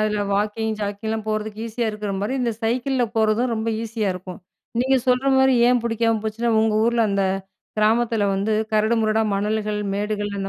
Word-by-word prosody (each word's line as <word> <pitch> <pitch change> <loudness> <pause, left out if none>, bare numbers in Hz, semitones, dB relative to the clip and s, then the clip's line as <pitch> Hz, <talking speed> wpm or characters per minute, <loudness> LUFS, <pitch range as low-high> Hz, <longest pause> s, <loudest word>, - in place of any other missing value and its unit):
அதுல 210 -1 0
வாக்கிங், 215 +2 0
ஜாக்கிங்லாம் 215 +2 -3
போறதுக்கு 215 0 -3
ஈஸியா 230 +1 -2
இருக்குற 210 -1 -5
மாரி, 210 +6 -1
இந்த 235 -2 0
சைக்கிள்ல 250 +3 +1
போறதும் 220 +3 +2
ரொம்ப 220 0 -2
ஈஸியா 225 -2 -2
இருக்கும். 185 0 -8 0.4
நீங்க 265 +1 +3
சொல்ற 255 +2 +2
மாரி 265 0 +5
ஏன் 245 -1 +3
புடிக்காம 230 -1 +1
போச்சுன்னா, 230 +2 -1
உங்க 220 -1 +2
ஊர்ல 235 0 +2
அந்த 200 -1 +1 0.5
கிராமத்தில 225 0 +2
வந்து 200 +3 0 0.2
கரடு 215 +2 +3
முரடா 220 0 +2
மணல்கள், 210 +1 -1
மேடுகள் 205 0 -2
அந்த 195 - -3
220 Hz, 165 wpm, -22 LUFS, 210-235 Hz, 0.5 s, மாரி